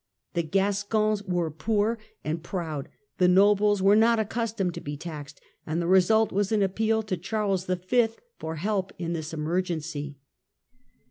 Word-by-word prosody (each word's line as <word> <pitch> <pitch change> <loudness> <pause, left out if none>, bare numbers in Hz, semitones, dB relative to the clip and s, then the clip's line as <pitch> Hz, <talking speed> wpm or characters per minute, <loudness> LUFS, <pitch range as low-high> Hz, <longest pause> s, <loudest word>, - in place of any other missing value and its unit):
The 170 - +1
Gascons 200 +4 +1
were 175 -5 -1
poor 215 +8 0 0.2
and 160 +2 -2
proud, 160 -5 -4 0.3
the 180 - +5
nobles 205 +2 +4
were 200 +1 +6
not 230 +2 +5
accustomed 220 -4 -1
to - - -7
be 145 0 -5
taxed, 150 -3 -8 0.2
and 160 +2 -2
the 170 - -1
result 190 +5 +4
was 200 +1 0
an 210 -2 +3
appeal 220 +3 +1
to 195 -3 -2
Charles 195 0 -1
V. 185 +6 +2 0.3
for 160 0 -4
help 195 +3 -1
in 170 -1 -3
this 160 -2 -4
emergency. 155 -3 -3
190 Hz, 150 wpm, -27 LUFS, 165-210 Hz, 0.3 s, were